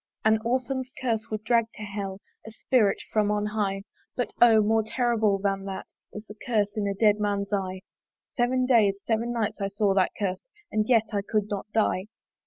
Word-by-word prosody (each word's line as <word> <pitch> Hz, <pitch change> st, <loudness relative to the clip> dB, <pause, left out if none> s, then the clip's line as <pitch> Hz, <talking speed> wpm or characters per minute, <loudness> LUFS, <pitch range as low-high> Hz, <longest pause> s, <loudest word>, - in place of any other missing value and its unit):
An 220 Hz, 0 st, +4 dB
orphan's 255 Hz, +2 st, -1 dB
curse 230 Hz, -4 st, -1 dB
would 215 Hz, -1 st, -4 dB
drag 230 Hz, 0 st, +3 dB
to 215 Hz, -, -8 dB
Hell 200 Hz, -1 st, -5 dB, 0.3 s
A -, -, -5 dB
spirit 220 Hz, -1 st, +2 dB, 0.2 s
from 210 Hz, -1 st, +2 dB
on 210 Hz, 0 st, 0 dB
high: 205 Hz, -2 st, -1 dB, 0.3 s
But 245 Hz, -, -2 dB
O! 230 Hz, -2 st, +7 dB
more 220 Hz, +1 st, +2 dB
horrible 220 Hz, -3 st, +1 dB
than 195 Hz, 0 st, -1 dB
that 195 Hz, -1 st, -6 dB, 0.2 s
Is 210 Hz, +1 st, -8 dB
the 210 Hz, -, -10 dB
curse 210 Hz, -5 st, 0 dB
in 210 Hz, -2 st, -1 dB
a 200 Hz, -, -1 dB
dead 210 Hz, 0 st, +3 dB
man's 205 Hz, -1 st, -1 dB
eye! 190 Hz, -2 st, -2 dB, 0.5 s
Seven 255 Hz, +1 st, +1 dB
days, 215 Hz, -6 st, +3 dB
seven 230 Hz, +2 st, 0 dB
nights 225 Hz, -3 st, -2 dB
I 195 Hz, -, 0 dB
saw 200 Hz, 0 st, +1 dB
that 190 Hz, -1 st, +2 dB
curse 190 Hz, -3 st, -2 dB, 0.3 s
And 215 Hz, +1 st, 0 dB
yet 225 Hz, -3 st, +4 dB
I 200 Hz, -, +1 dB
could 210 Hz, 0 st, -1 dB
not 200 Hz, 0 st, -3 dB
die. 210 Hz, -3 st, +1 dB
210 Hz, 195 wpm, -26 LUFS, 200-230 Hz, 0.5 s, O